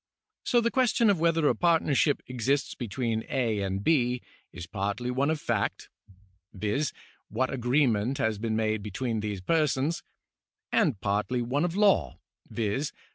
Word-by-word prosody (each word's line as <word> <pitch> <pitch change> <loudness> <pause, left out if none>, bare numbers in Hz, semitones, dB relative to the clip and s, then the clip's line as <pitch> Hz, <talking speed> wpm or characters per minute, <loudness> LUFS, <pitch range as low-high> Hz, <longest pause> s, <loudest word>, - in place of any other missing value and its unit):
So 240 -2 +3
the 235 0 +1
question 235 -5 +3
whether 165 -2 +2
a - - +4
partnership 160 -4 +2
exists 130 +3 -1
between 115 -1 -2
A. 115 -5 0
and 95 0 -2
B. 125 -5 +2 0.3
is 90 -1 -8
partly 100 +6 -3
one 135 +3 +1
of 160 -1 0
fact 115 -7 -2 0.7
(viz., 105 +9 -1 0.4
what 130 +5 -1
agreement 125 -2 +1
has 110 -6 0
been 110 0 -1
made 110 -1 0
between 110 +3 -3
these 105 -3 -4
persons), 155 - +1 0.7
and 155 - +2
partly 105 +6 0
one 140 +7 0
of 175 0 -3
law 195 - +3 0.3
(viz. 115 +6 -2
125 Hz, 140 wpm, -28 LUFS, 105-150 Hz, 0.7 s, a